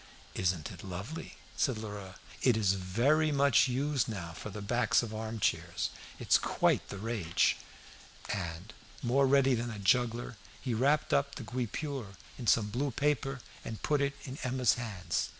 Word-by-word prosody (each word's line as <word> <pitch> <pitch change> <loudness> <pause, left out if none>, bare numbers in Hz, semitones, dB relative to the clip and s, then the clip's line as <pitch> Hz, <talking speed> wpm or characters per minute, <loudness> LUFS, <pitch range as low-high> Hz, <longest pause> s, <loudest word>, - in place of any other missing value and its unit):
"Isn't 90 -4 -1
it - - -10
lovely?" 100 - -6 0.2
said 130 -1 +1
Lheureux. 105 -3 -7 0.3
"It 125 -4 +4
is 100 -3 +3
very 120 +12 +2
much 140 -3 +5
used 135 +1 0
now 85 -6 -5
for 95 - -7
the 105 +1 -7
backs 120 +4 +2
of 110 -2 -5
arm 110 +1 -4
chairs. - - 0 0.3
It's - - +4
quite - - +1
the 100 - -5
rage." 105 -5 +1 0.8
And, 90 +2 -5 0.3
more 135 +3 +3
ready 135 0 +5
than 120 0 -1
a 110 - -6
juggler, 120 +3 +1 0.2
he 125 - -2
wrapped 140 +6 +2
up 140 0 +2
the 135 - -6
guipure 125 -1 -4 0.2
in 120 - -5
some 105 -1 +4
blue 135 +6 0
paper 135 0 0 0.2
and 110 - -7
put 150 -1 +2
it 140 0 0
in 135 0 -7
Emma's 130 -3 +2
hands. 110 -7 -2
120 Hz, 165 wpm, -32 LUFS, 100-135 Hz, 0.8 s, much